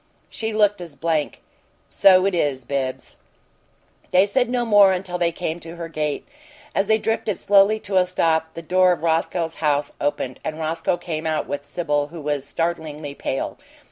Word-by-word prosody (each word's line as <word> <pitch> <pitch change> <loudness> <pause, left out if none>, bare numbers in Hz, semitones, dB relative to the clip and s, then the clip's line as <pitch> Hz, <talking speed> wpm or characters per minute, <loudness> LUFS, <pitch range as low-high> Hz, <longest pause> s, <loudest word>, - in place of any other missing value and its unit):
She 220 0 -3
looked 205 -3 +2
as 165 -4 -8
blank. 155 0 -1 0.5
"So 185 -1 +5
it 195 - +1
is, 140 -7 -1
Bibbs." 130 -1 -3 0.9
They 185 +2 +5
said 245 +4 +1
no 245 -1 0
more 205 -3 +6
until 180 -1 -4
they 170 -1 +2
came 170 -1 -4
to 165 0 -9
her 170 -1 -6
gate. 150 -2 -3 0.5
As 195 - +1
they 220 0 +4
drifted 220 -3 -1
slowly 205 +2 +4
to 195 -1 -1
a 185 - +5
stop, 160 -3 0
the 165 - -7
door 185 +2 +4
of 165 -2 -7
Roscoe's 165 0 0
house 145 -2 +1
opened, 135 -3 -2
and 155 - -4
Roscoe 165 +2 -1
came 160 -2 -4
out 155 -1 0
with 145 0 -5
Sibyl, 145 -2 -1
who 165 +2 -10
was 145 -2 -2
startlingly 160 -3 -3
pale. 135 - -4
165 Hz, 175 wpm, -22 LUFS, 150-190 Hz, 0.9 s, more